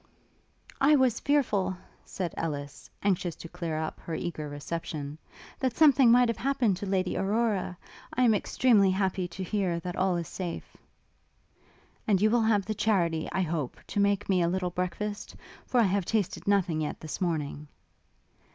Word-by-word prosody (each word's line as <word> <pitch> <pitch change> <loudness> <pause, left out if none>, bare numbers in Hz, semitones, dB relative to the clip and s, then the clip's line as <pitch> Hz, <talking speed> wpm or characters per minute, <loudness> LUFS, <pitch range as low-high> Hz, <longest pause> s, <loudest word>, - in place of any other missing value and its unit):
'I 295 +2 +6
was 260 -4 +3
fearful,' 205 -10 +1 0.3
said 180 -4 -4
Ellis, 145 -3 -5
anxious 185 -4 0
to 165 - -9
clear 165 -1 -4
up 155 0 -4
her 165 - -5
eager 155 -3 -4
reception, 145 0 -5 0.4
'that 260 -3 -1
something 275 -5 +6
might 245 +1 +6
have 230 -3 -2
happened 255 -8 +1
to 200 - -5
Lady 190 -1 0
Aurora; 205 -3 0 0.3
I 255 - +1
am 230 -3 +5
extremely 210 -1 +3
happy 190 -1 0
to 180 +2 -6
hear 185 -3 -1
that 180 +1 -5
all 185 -1 +1
is 170 -2 -4
safe.' 175 -3 -6 1.3
'And 200 -3 +3
you 215 +2 +3
will 240 0 +3
have 215 -3 +2
the 215 - -2
charity, 175 -7 +1
I 190 - 0
hope, 155 -6 -3
to - - -3
make 200 0 +2
me 185 -2 +2
a 170 - +2
little 180 0 -1
breakfast? 205 +4 -4 0.3
for 250 - +2
I - - +6
have 195 -2 +1
tasted 210 -2 -1
nothing 185 -6 +2
yet 150 - -3
this 155 +4 -6
morning.' 150 -4 -2
190 Hz, 170 wpm, -28 LUFS, 170-215 Hz, 1.3 s, I